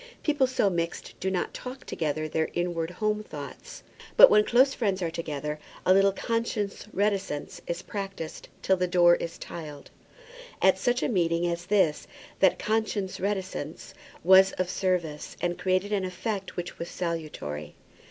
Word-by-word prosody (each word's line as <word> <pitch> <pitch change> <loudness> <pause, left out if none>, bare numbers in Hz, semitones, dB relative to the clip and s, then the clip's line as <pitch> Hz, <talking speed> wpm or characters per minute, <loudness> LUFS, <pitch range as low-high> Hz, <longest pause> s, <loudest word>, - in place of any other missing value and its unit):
People 290 -4 +2
so 255 -5 +1
mixed 170 -3 -2
do 190 - -1
not 185 -2 -2
talk 255 +1 -8
together 155 -1 -2
their 160 +1 -1
inward 175 -2 -1
home 215 +3 -1
thoughts. 145 -9 -9 0.3
But - - +10
when 210 0 +6
close 260 +5 +4
friends 195 -5 -1
are 165 - -1
together, 150 -2 -4 0.3
a 185 - +6
little 195 +1 +5
conscious 220 -1 -2
reticence 190 -4 -1
is 170 +1 -3
practised 195 -5 -6
till 190 - +3
the 180 0 +1
door 175 -1 +6
is 170 - -5
tiled. 150 -4 -8 0.7
At 190 0 +4
such 245 +5 +1
a - - +2
meeting 170 -5 +1
as 175 0 -2
this 190 -7 +2 0.3
that 190 - +5
conscious 215 -3 -1
reticence 190 -6 -4 0.3
was 190 +2 +7
of 185 0 -2
service, 175 -7 -2
and 175 0 -2
created 185 +2 +1
an 200 -2 +1
effect 185 +2 -4
which 175 0 -5
was 170 - -4
salutary. 155 - -4
185 Hz, 155 wpm, -27 LUFS, 165-200 Hz, 0.7 s, But